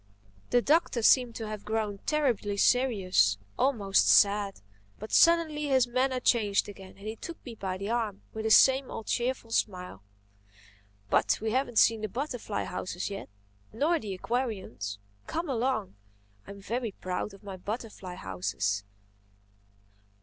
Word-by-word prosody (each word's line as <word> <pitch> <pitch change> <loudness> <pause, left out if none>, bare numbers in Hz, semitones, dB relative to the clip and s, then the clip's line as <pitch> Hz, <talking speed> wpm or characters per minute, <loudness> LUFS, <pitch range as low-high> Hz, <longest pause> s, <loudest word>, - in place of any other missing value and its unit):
The 245 -1 +3
Doctor 295 -6 +2
seemed 245 -1 +5
to 225 - -5
have 215 -1 -6
grown 215 -2 -2
terribly 245 -9 0
serious—almost 195 - +2
sad. 200 -1 +4 0.4
But 215 - -9
suddenly 330 -3 +4
his 260 -3 +4
manner 255 +1 0
changed 215 -5 +2
again 195 -2 -11
and 200 +2 -10
he 220 - -4
took 335 +8 -8
me 245 - -7
by 190 -4 -4
the 200 +3 -4
arm 225 -4 -2
with 220 0 -5
his 220 - +8
same 265 0 +4
old 225 - -6
cheerful 240 -1 -2
smile. 180 - -2 1.1
"But - - +3
we 220 0 -2
haven't 245 -1 -1
seen 225 0 +5
the 215 - -2
butterfly 245 -3 -3
houses 185 +2 -4
yet—nor 100 - -3
the 200 -6 -5
aquariums. 190 - -3 0.3
Come 330 +2 -3
along. 245 -5 -1 0.5
I - - -12
am 200 0 -9
very 230 +1 -3
proud 185 +3 -4
of 195 - -19
my 195 -2 -7
butterfly 205 -2 -6
houses." 95 - -2
215 Hz, 140 wpm, -29 LUFS, 195-250 Hz, 1.1 s, his